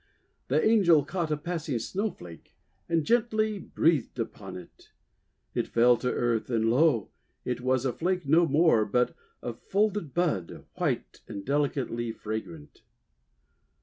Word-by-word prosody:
The 150 +9 +2
Angel 175 -10 +5
caught 170 +1 -2
a 150 - 0
passing 160 -4 -3
Snowflake, 115 - -5 0.3
and 165 -2 +1
gently 220 -1 +1
breathed 160 -6 0
upon - - -5
it. - - -14 0.6
It - - -1
fell 120 +1 +5
to 125 +2 -1
earth, 120 -1 0
and, 115 -2 +1
lo! 130 -4 +3 0.3
it 125 0 -2
was 130 0 +1
a 130 - 0
flake 180 -2 -1
no 165 +4 +5
more, 150 -6 +4
but 125 +4 0 0.3
a - - -3
folded 205 -6 -1
bud, 160 - -1
white - - -2
and 100 -1 -7
delicately 135 -5 -1
fragrant. 115 +9 -7
145 Hz, 135 wpm, -28 LUFS, 120-175 Hz, 0.6 s, Angel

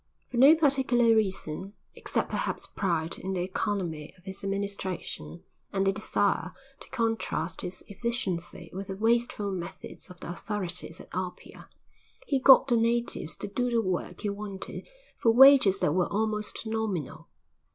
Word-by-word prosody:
For 245 - -3
no 275 +6 +8
particular 260 -6 +3
reason, 195 -3 -1 0.2
except - - -2
perhaps - - -2
pride 170 -4 -2
in 190 +1 -3
the 180 -2 -1
economy 180 -5 -3
of 180 - -23
his 190 +1 -8
administration 190 - -4 0.3
and 195 0 0
the 195 - +4
desire 200 -3 0 0.3
to - - -12
contrast 225 -8 -1
his 180 0 -7
efficiency 190 -7 -4
with 195 +1 -5
the 190 - -4
wasteful 225 -2 +1
methods 180 +1 -7
of 180 -1 -13
the - - -6
authorities 180 -3 -4
at - - -12
Apia, 180 0 -6 0.6
he 275 - +1
got 265 +1 +8
the 240 -3 +3
natives 230 -9 0
to 205 - -5
do 245 +5 -1
the 235 -1 +2
work 185 -3 -2
he 210 - -1
wanted 200 -1 -6 0.3
for 230 - +3
wages 250 -5 +7
that 150 - +2
were 180 0 +1
almost 215 +1 -1
nominal. 220 -9 -3
200 Hz, 150 wpm, -28 LUFS, 180-230 Hz, 0.6 s, no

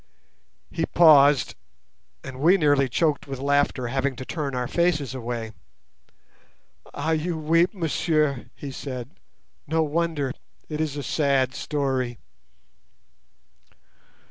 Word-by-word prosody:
He - - -2
paused, 145 -6 +5 0.7
and 130 0 -8
we 170 +7 +5
nearly 145 -5 +3
choked 150 +4 0
with 135 -1 -5
laughter, 140 -2 +1
having 135 +1 -1
to 130 - -8
turn 145 -4 -4
our 125 -1 -2
faces 165 -6 0
away. 120 -3 -5 1.4
"Ah! 150 +3 -2
you 160 +1 -1
weep, 165 +3 +2
messieurs," 155 -5 0
he 140 - -7
said. 130 -1 -6 0.6
"No 160 +2 +1
wonder—it 155 -1 -3
is 150 -2 -2
a 145 - -4
sad 135 -2 +1
story." 130 -4 -2
145 Hz, 110 wpm, -24 LUFS, 130-155 Hz, 1.4 s, paused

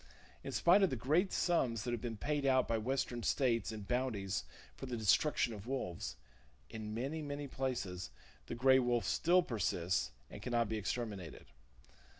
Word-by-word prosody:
In - - -5
spite 180 +4 +5
of 195 - +5
the 130 - -1
great 155 - +2
sums 125 - +1
that 120 - -2
have 120 -2 -2
been 115 -3 -4
paid 145 +5 -1
out 130 -2 +3
by 115 -1 +1
western 120 0 -1
states 115 -2 +1
in 110 -1 -6
bounties 100 - -1 0.3
for 135 - -7
the 125 -2 -3
destruction 115 - +3
of 105 +1 -9
wolves, 100 - -3 0.6
in 110 -1 -5
many, 140 +7 -2
many 145 -1 -4
places 120 - -3 0.4
the - - -4
gray 130 +2 +5
wolf 120 -4 +1
still 180 +2 +3
persists, 90 - 0 0.2
and - - -8
can 125 - -4
not 115 -1 +3
be 110 - -1
exterminated. 105 -5 -4
120 Hz, 170 wpm, -35 LUFS, 105-135 Hz, 0.6 s, spite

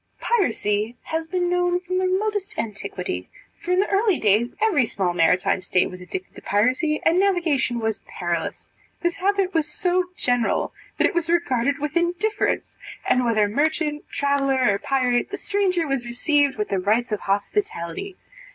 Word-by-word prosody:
Piracy 225 - 0
has 320 0 -3
been 355 +1 0
known 355 0 +1
from 365 +1 -2
the 370 - +1
remotest 410 +2 -1
antiquity; 200 - -4 0.3
for 345 - -9
in 360 - +3
the 400 - +2
early 400 -1 +3
ages 215 +4 +3
every 365 - +3
small 185 -4 -1
maritime 180 +2 +2
state 185 0 +1
was 180 0 -10
addicted 185 +1 -6
to - - -12
piracy, 255 - +1
and 335 +3 +4
navigation 335 -11 +1
was 220 -2 -1
perilous. 175 -2 -3 0.3
This 345 +2 0
habit 390 -1 +1
was 320 -3 +1
so 360 0 +1
general, 245 -6 0 0.2
that - - +3
it - - +2
was 340 -1 0
regarded 280 -6 +1
with 295 +1 -4
indifference, 355 +5 0 0.3
and, 250 0 +3
whether 220 -3 +2
merchant, 300 +5 -1
traveller, 275 -4 +2
or 200 - -2
pirate, 250 -1 +1
the - - -4
stranger 380 -4 0
was 275 -4 -1
received 285 +3 +2
with 210 - -2
the 195 - 0
rights 220 +6 +1
of 210 - 0
hospitality. 205 - -2
285 Hz, 165 wpm, -23 LUFS, 215-360 Hz, 0.3 s, and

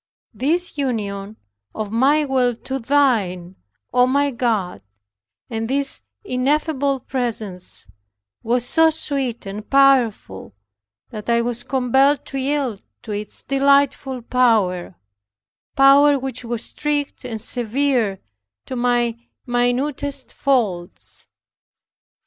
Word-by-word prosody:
This 325 +3 -1
union 210 -5 -3 0.4
of 215 -2 -4
my 280 +6 +3
will 255 -3 +1
to 265 +3 -5
Thine, 220 -10 +1 0.4
O 250 0 +5
my 280 +2 +2
God, 220 - -1 0.7
and 225 0 -4
this 275 0 0 0.2
ineffable 275 +1 0
presence 220 -9 -3 0.6
was 240 +1 0
so 320 +5 +4
sweet 275 -7 -3
and 205 +2 -7
powerful, 255 - +2 0.6
that 215 0 -7
I 235 0 +3
was 240 0 -3
compelled 265 +3 +2
to 270 - -4
yield 265 -6 -1 0.2
to 220 - -7
its 210 0 -4
delightful 275 -2 +2
power, 215 - +1 0.8
power 280 +1 +6
which 265 -1 -5
was 235 -1 -4
strict 295 -1 -3
and 225 -2 -5
severe 240 -3 0 0.5
to 260 - -5
my 240 -1 +1 0.3
minutest 260 +3 -1
faults. 205 -10 -2
250 Hz, 105 wpm, -21 LUFS, 225-275 Hz, 0.8 s, power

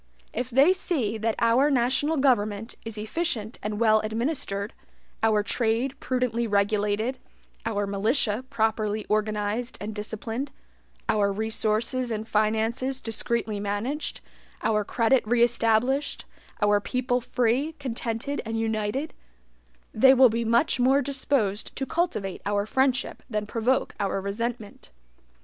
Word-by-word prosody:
If 245 +2 -2
they 275 +9 +5
see 265 - -1
that 220 0 0
our 235 +5 +4
national 270 +4 +1
government 225 -5 +1
is 225 -1 -7
efficient 220 -1 -2
and 210 0 -3
well 220 -2 +5
administered, 220 -2 -2 0.5
our 215 -2 +3
trade 235 +4 0
prudently 250 -2 0
regulated, 210 +4 +1 0.5
our 205 -2 0
militia 215 +3 +1
properly 220 -3 0
organized 215 +3 -1
and 210 +1 -5
disciplined, 225 +5 -4 0.6
our 205 -2 +2
resources 220 +4 0
and 220 -1 -3
finances 225 +5 0
discreetly 225 -2 -1
managed, 205 +9 -3 0.4
our 210 -1 +2
credit 235 +5 +2
re 235 +1 +4
established, 240 +4 +1 0.4
our 205 0 +4
people 250 +2 0
free, 250 +6 0
contented, 255 -1 -3
and 225 -1 -3
united, 225 +6 -1 0.8
they 265 +4 +6
will 255 -1 +7
be 230 +1 -1
much 235 +4 +2
more 265 +3 +4
disposed 260 -6 -1
to 270 - -2
cultivate 250 - -2
our 205 0 +1
friendship 265 +3 0
than 210 -2 -2
provoke 235 +4 0
our 195 -1 0
resentment. 210 - -4
225 Hz, 125 wpm, -26 LUFS, 210-255 Hz, 0.8 s, will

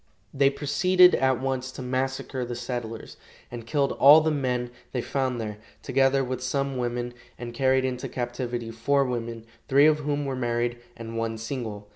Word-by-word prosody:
They 140 0 +4
proceeded 180 +6 +4
at 130 -2 +2
once 130 -1 -2
to 130 - -7
massacre 130 0 -2
the 120 0 -5
settlers, 120 -2 -6 0.3
and 120 -1 -8
killed 140 +2 +1
all 145 +3 +9
the 160 0 +1
men 125 -4 -1 0.2
they 125 - -1
found 130 -3 -1
there, 105 -2 -5 0.2
together 135 0 +2
with 130 0 -4
some 135 +1 -1
women, 120 0 -2 0.2
and 120 -1 -7
carried 130 +1 +2
into 125 -1 -3
captivity 120 -1 -4
four 135 +5 +1
women, 115 -2 -4 0.2
three 140 +1 +5
of 155 0 +4
whom 145 -1 -2
were 135 -1 -2
married 120 -1 -1 0.2
and 115 0 -6
one 115 0 -2
single. 110 -3 -5
130 Hz, 170 wpm, -26 LUFS, 120-135 Hz, 0.3 s, all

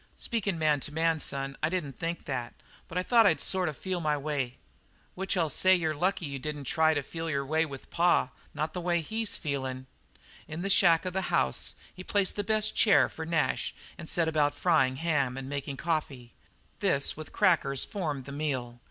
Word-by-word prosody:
"Speakin' 205 -6 -2
man 155 -2 +2
to 145 - -4
man, 160 +1 +1
son, 135 -1 -1
I - - +2
didn't 155 -8 -3
think 170 +1 -3
that, 125 -3 -4 0.3
but 170 - -6
I 180 - +1
thought 230 +1 +5
I'd - - +3
sort 185 -3 +2
of 150 - -7
feel 185 -2 -3
my 150 -2 +1
way." 140 -4 -2 0.6
"Which 190 +1 -2
I'll 165 -2 +2
say 185 +5 +5
you're 160 -3 0
lucky 180 +4 0
you 140 -1 -5
didn't 150 +1 -5
try 160 +4 +2
to 145 - -1
feel 165 +3 -5
your 140 -2 -1
way 160 +3 +1
with 135 -2 -10
pa; 175 +1 +3 0.2
not 155 +2 -2
the 180 - -3
way 175 -1 +1
he's 220 +6 -3
feelin' 130 -4 -3 0.6
now." - - -7
In 165 - -4
the 195 - 0
shack 175 -5 +5
of 185 - -3
the 190 -1 -2
house 65 - 0 0.2
he 185 - -9
placed 200 0 +1
the 205 - -1
best 215 +1 0
chair 210 -3 +5
for 160 0 -7
Nash 165 -2 0 0.2
and 160 - -8
set 170 -2 +2
about 150 -2 +2
frying 145 -5 +3
ham 140 -4 0
and 135 -1 -5
making 140 0 -4
coffee. 140 -6 -3 0.5
This 175 -9 +1
with 155 0 -9
crackers, 165 -9 +2
formed 155 - -3
the 140 - -8
meal. 130 -5 -3
160 Hz, 205 wpm, -29 LUFS, 140-180 Hz, 0.6 s, thought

